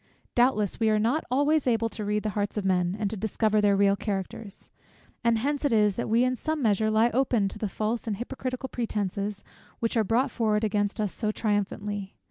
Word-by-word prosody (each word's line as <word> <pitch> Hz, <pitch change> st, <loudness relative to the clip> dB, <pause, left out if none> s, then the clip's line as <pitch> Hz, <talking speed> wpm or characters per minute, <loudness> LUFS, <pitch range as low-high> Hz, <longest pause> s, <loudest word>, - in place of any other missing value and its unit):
Doubtless 240 Hz, -5 st, +2 dB
we 225 Hz, -1 st, +3 dB
are 215 Hz, -, +3 dB
not 235 Hz, +9 st, +1 dB
able -, -, -23 dB
always 300 Hz, +1 st, +2 dB, 0.3 s
to 215 Hz, -, -5 dB
read 210 Hz, +1 st, -1 dB
the 215 Hz, -, -1 dB
hearts 205 Hz, +1 st, -2 dB
of 205 Hz, -, -2 dB
men, 180 Hz, 0 st, +1 dB
and 210 Hz, -, 0 dB
to -, -, -3 dB
discover 215 Hz, +1 st, +1 dB
their 205 Hz, -1 st, +4 dB
real 200 Hz, 0 st, +4 dB
characters; 200 Hz, 0 st, -5 dB, 0.5 s
and 230 Hz, -1 st, +3 dB
hence 285 Hz, +5 st, -1 dB
it 285 Hz, -, +2 dB
is, 210 Hz, -2 st, +4 dB
that 235 Hz, -, -3 dB
we 230 Hz, +2 st, +4 dB
in 255 Hz, 0 st, +1 dB
some 315 Hz, +5 st, -2 dB
measure 220 Hz, -3 st, +2 dB
lie 220 Hz, +2 st, +3 dB
open 240 Hz, -4 st, +2 dB
to 215 Hz, -, -9 dB
the 210 Hz, -, -2 dB
false 220 Hz, +4 st, -2 dB
and 210 Hz, -3 st, -1 dB
hypocritical 255 Hz, +2 st, -4 dB
pretences 205 Hz, -4 st, -3 dB, 0.3 s
which 230 Hz, +1 st, -1 dB
are 225 Hz, -, +3 dB
brought 235 Hz, +6 st, +1 dB
forward 215 Hz, -2 st, +1 dB
against 205 Hz, 0 st, 0 dB
us 210 Hz, -3 st, -1 dB
so 215 Hz, -, -2 dB
triumphantly. 205 Hz, -2 st, -2 dB
215 Hz, 210 wpm, -27 LUFS, 205-235 Hz, 0.5 s, their